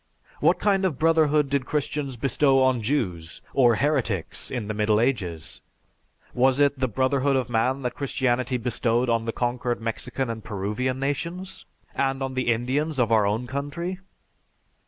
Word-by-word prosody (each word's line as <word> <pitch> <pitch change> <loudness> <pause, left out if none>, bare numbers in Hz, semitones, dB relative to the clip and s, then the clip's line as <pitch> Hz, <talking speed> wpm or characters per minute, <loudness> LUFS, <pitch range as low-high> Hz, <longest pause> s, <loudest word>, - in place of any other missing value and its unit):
What - - +4
kind 195 -2 +2
of 175 -8 0
brotherhood 155 -2 +3
did 135 -1 -1
Christians 145 -3 -2
bestow 135 +2 +2
on 130 -2 +2
Jews 95 - -2
or 120 -4 +5
heretics 115 - -1
in 120 -5 -4
the 110 - -2
Middle 105 0 +2
Ages? 100 - -2 0.7
Was 130 +2 +3
it 145 -1 +3
the 130 - +1
brotherhood 130 +4 +1
of 125 -2 -1
man 130 +4 +1
that 125 - -2
Christianity 130 -2 0
bestowed 120 0 0
on 115 -1 +1
the 115 - -1
conquered 120 0 -1
Mexican 115 +3 -3
and 115 -2 -5
Peruvian 105 +6 -2
nations, 170 +7 -4 0.3
and 135 0 0
on 135 0 -3
the 130 -2 +1
Indians 135 +6 -1
of 120 -3 +1
our 110 -2 +4
own 110 +4 -1
country? 145 +8 -4
130 Hz, 155 wpm, -25 LUFS, 115-140 Hz, 0.7 s, or